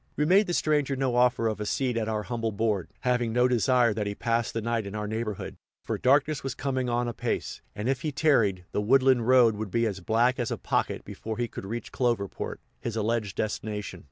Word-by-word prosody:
We 150 - +1
made 195 +6 +5
the 175 - -1
stranger 145 -3 +1
no 130 -2 0
offer 125 -1 +3
of 110 -1 -2
a - - -2
seat 125 0 0
at 110 -1 -1
our 105 -1 -1
humble 115 -2 -2
board, 105 -3 -1
having 125 -2 +1
no 125 +2 +3
desire 125 -1 +3
that 105 -1 -2
he 100 - -3
pass 115 +1 0
the 115 - -2
night 115 -2 -1
in 100 - -6
our 105 0 -3
neighborhood; 110 -2 -4 0.3
for - - -3
darkness 145 +3 +3
was 135 -1 -3
coming 130 -3 -1
on 120 0 0
apace, 120 - -3
and, 105 +3 -3
if 130 -1 0
he 155 - -2
long 150 - -2
tarried, 110 - +2
the - - 0
woodland 130 +1 +4
road 125 -4 +6
would 110 -1 -4
be 115 +3 +1
as 100 -3 -2
black 115 +7 +2
as 120 - -1
a - - -2
pocket - - -1
before 110 -1 -6
he 120 0 -1
could 95 - -8
reach 120 +3 -5
Cloverport, 120 -6 -1 0.2
his 115 -2 -4
alleged 110 -3 -1
destination. 105 -3 -3
115 Hz, 225 wpm, -27 LUFS, 110-130 Hz, 0.3 s, road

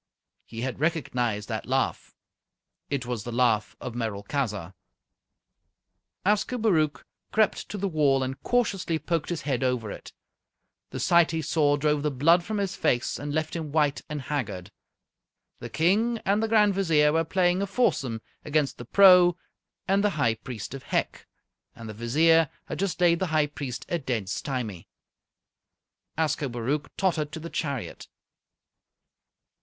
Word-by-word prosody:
He 115 0 -7
had 130 0 -3
recognized 125 -9 -1
that - - -4
laugh. - - -1 0.7
It 140 -3 -2
was 120 -4 -4
the 120 - -6
laugh 115 -3 +1
of 125 - -6
Merolchazzar. 105 - -3 1.5
Ascobaruch 205 - +1 0.3
crept 215 -1 +1
to 210 - -5
the 200 0 -1
wall 145 -6 +2
and 130 +1 -5
cautiously 200 -9 0
poked 165 -1 -2
his 170 -3 -3
head 130 -5 -1
over 125 -5 -1
it. - - -9 0.8
The - - -6
sight 170 -1 +4
he 160 -1 -2
saw 145 -1 +2
drove 150 0 +1
the 150 - 0
blood 165 +6 +3
from 215 +4 -3
his 195 -2 -2
face 120 0 0
and 145 +1 -4
left 155 +2 -2
him 160 -3 -4
white 150 -2 +1
and 150 -2 -4
haggard. 115 - -4 0.9
The - - -7
King 210 +9 +2
and 200 +2 +2
the 225 - +1
Grand 210 -2 +4
Vizier 160 -6 +3
were 165 0 +2
playing 180 +2 +1
a 200 - -1
foursome 135 - 0 0.2
against 150 -2 0
the 120 - -7
Pro 180 - +7 0.5
and 195 +1 +2
the 210 - +4
High 120 -6 +3
Priest 115 0 -7
of 135 - -6
Hec, - - -2 0.5
and 115 - -9
the 110 - -6
Vizier 155 +8 +3 0.2
had - - -6
just 195 -2 -1
laid 170 -1 +4
the 190 - 0
High 155 -2 +2
Priest 140 -4 -6
a 170 - -1
dead 120 -9 -3
stymie. 115 - -4 1.3
Ascobaruch 145 -3 -1
tottered 160 -6 0
to - - -5
the 165 +1 -8
chariot. 140 -6 -4
150 Hz, 150 wpm, -26 LUFS, 125-175 Hz, 1.5 s, Pro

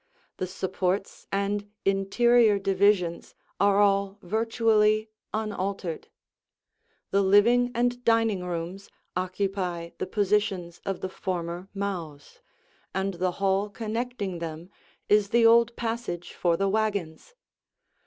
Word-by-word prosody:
The 185 - -2
supports 190 +1 -2
and 200 +1 -1 0.2
interior 210 +3 +4
divisions 195 -3 +1 0.2
are 200 0 +4
all 200 -1 +2
virtually 215 +1 +2 0.2
unaltered. 200 -5 -3 1.0
The 200 - +3
living 225 +6 +5
and 245 +1 0
dining 225 -5 +2
rooms 180 +2 -5 0.3
occupy 185 -2 -2
the - - -2
positions 195 -4 0
of 195 -2 -2
the 190 - -3
former 180 0 -4
mows, 170 -8 -5 0.6
and 195 +1 -1
the 180 +1 -1
hall 195 +2 0
connecting 220 -3 -4
them 165 +2 -7 0.4
is 210 -1 +3
the 235 +1 +4
old 235 +1 +5
passage 225 -7 -4
for 170 -2 +1
the 195 - +1
wagons. 205 - -2
195 Hz, 110 wpm, -27 LUFS, 185-215 Hz, 1.0 s, living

